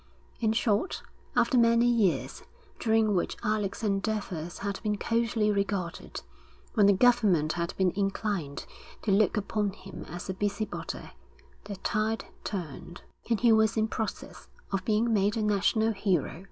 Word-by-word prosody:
In 220 -2 +2
short, 225 - 0 0.3
after 255 -5 +4
many 235 0 +5
years 230 -7 +1 0.4
during 220 -2 +3
which 180 - -1
Alec's 210 -1 -1
endeavours 195 -5 -2
had 200 -1 -3
been 210 -2 -1
coldly 230 -1 +1
regarded, 200 -3 -3 0.5
when 205 -3 +5
the - - +7
government 195 -9 +3
had 170 +1 -3
been 185 -1 +3
inclined 195 -6 -2 0.4
to 210 - +1
look 210 +2 +3
upon 205 -1 -1
him 190 -1 -10
as 175 +2 -6
a 190 - -2
busybody, 205 +2 -4 0.5
the 200 -1 -5
tide 215 +3 -1 0.2
turned; 175 -3 -6 0.3
and 230 -3 +1
he 235 -1 +5
was 220 0 +4
in 220 0 +2
process 220 -1 -5 0.2
of 195 -1 -1
being 225 +2 +2
made 205 +2 +2
a 220 - 0
national 210 +2 +2
hero. 185 -6 0
210 Hz, 145 wpm, -29 LUFS, 195-220 Hz, 0.5 s, the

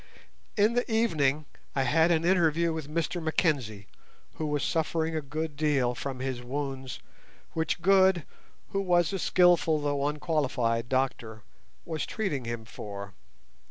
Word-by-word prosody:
In 210 +3 +4
the 245 -1 -1
evening 155 -10 +2 0.3
I 135 - +2
had 160 +6 +3
an 165 -1 +2
interview 170 -2 +3
with 155 -3 -5
Mr 170 +2 -2
Mackenzie, 140 - 0 0.5
who 155 - -2
was 150 -1 -1
suffering 160 0 0
a 155 - 0
good 155 +2 -4
deal 140 -5 +1
from 130 +3 -5
his 130 -1 -3
wounds, 135 0 -4 0.5
which 160 +1 -1
Good, 190 -3 +5 0.4
who 195 - -1
was 175 -1 +2
a 195 - -1
skilful 175 -3 +4
though 145 -1 0
unqualified 135 -6 0
doctor, 120 -4 -1 0.4
was 160 -3 -3
treating 160 - -2
him 115 -1 -4
for. 100 -2 -8
150 Hz, 140 wpm, -28 LUFS, 130-170 Hz, 0.5 s, Good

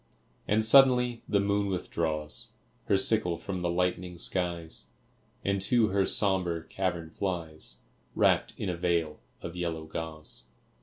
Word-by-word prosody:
And 110 +1 +2
suddenly 125 -1 +5
the 100 - +3
moon 100 0 0
withdraws 85 +3 -2 0.3
Her 100 - +3
sickle 95 -4 +4
from 95 0 -5
the 90 - -1
lightening 90 0 -1
skies, 85 -2 -1 0.6
And 100 0 0
to 110 +2 +3
her 95 0 +1
sombre 90 -5 +1
cavern 85 -2 -3
flies, 85 -5 -3 0.3
Wrapped - - +2
in 105 - -4
a 90 - -1
veil 85 -3 -1 0.2
of 85 - -6
yellow 85 -2 -3
gauze. 80 -1 -4
90 Hz, 135 wpm, -29 LUFS, 85-100 Hz, 0.6 s, suddenly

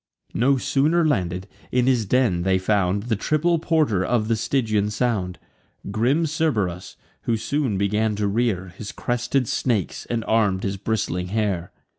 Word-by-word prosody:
No 135 +4 +3
sooner 155 +6 +2
landed, 90 - -1 0.2
in 125 -1 +2
his 125 -5 +2
den 120 -7 +2
they 95 +1 +2
found 100 0 +1
The 115 -1 0
triple 155 - +1
porter 155 - +1
of 110 +2 0
the 115 - +3
Stygian 110 -3 0
sound, 105 -5 -1 0.5
Grim 125 +10 +2
Cerberus, 110 - -1 0.3
who 115 - +1
soon 130 -3 -1
began 105 +2 +1
to 105 0 -1
rear 100 -3 0
His 105 +1 -7
crested 120 +1 -1
snakes, 110 -8 -1
and 115 -1 -2
arm'd 105 -4 +2
his 100 0 -2
bristling 95 -3 -2
hair. 100 -4 -1
110 Hz, 150 wpm, -23 LUFS, 95-125 Hz, 0.5 s, No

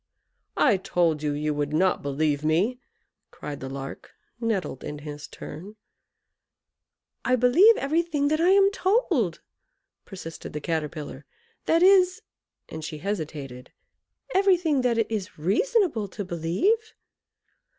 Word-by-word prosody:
"I 235 -9 +4
told 170 -4 0
you 150 -1 -1
you 150 +1 -1
would 145 0 -2
not 185 +4 +2
believe 145 +1 -1
me!" 185 +11 +1 0.5
cried 145 -1 -8
the 135 - -6
Lark, 135 0 -8 0.3
nettled 215 - -2
in 150 - -5
his 150 0 -8
turn. 200 +7 -10 1.5
"I 255 - +3
believe 305 - +6
everything 300 0 0
that 310 +1 +1
I 350 - +4
am 395 +1 +5
told" 365 - +1 0.6
persisted 175 -4 -9
the 150 - -3
Caterpillar; 150 -2 -4 0.4
"that 330 +2 +4
is" 375 +2 +5 0.4
and 160 0 -8
she 155 0 -5
hesitated 150 -8 -5 0.6
"everything 360 -7 +3
that 245 -2 +1
it 225 -1 0
is 205 -2 -4
reasonable 240 - +1
to 200 +1 -6
believe. 190 - 0
195 Hz, 125 wpm, -25 LUFS, -, 1.5 s, believe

